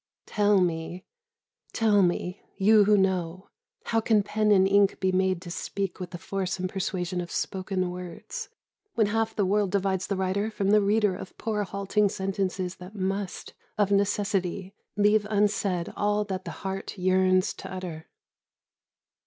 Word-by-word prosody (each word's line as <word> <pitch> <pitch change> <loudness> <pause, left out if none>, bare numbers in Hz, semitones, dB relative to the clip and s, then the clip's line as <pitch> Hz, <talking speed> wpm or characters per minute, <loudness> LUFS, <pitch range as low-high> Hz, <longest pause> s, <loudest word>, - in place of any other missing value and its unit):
Tell 205 -2 +3
me, 175 +1 -2 0.7
tell 215 -3 +3
me, 180 +1 0 0.2
you 210 +1 +5
who 210 0 +5
know, 185 -1 -1 0.3
how 225 -1 +1
can 220 -2 +3
pen 215 +1 0
and 190 -2 +5
ink 200 0 +3
be 190 -1 +1
made 185 -1 +1
to 175 - -7
speak 195 +2 -4
with 180 -1 -5
the 175 - -7
force 190 +1 -3
and 185 0 -2
persuasion 185 -1 -2
of 175 - -7
spoken 185 -1 -2
words, 180 -1 -7 0.5
when 220 - +4
half 225 +2 -1
the 205 - +1
world 205 +1 +2
divides 190 -1 0
the 200 - -1
writer 190 +3 0
from 200 -2 0
the 210 0 +6
reader 205 -1 +2
of 185 - -10
poor 215 -2 -2
halting 200 +2 +1
sentences 190 -2 -2
that 180 +4 -11
must, 195 -1 -3 0.2
of 205 -1 +2
necessity, 200 -1 0 0.2
leave 210 0 +3
unsaid 200 -4 0
all 210 0 +1
that 190 -2 -4
the - - -4 0.2
heart 195 +1 -4
yearns 185 +1 +3
to - - -9
utter? 175 -4 -6
195 Hz, 160 wpm, -27 LUFS, 185-205 Hz, 0.7 s, the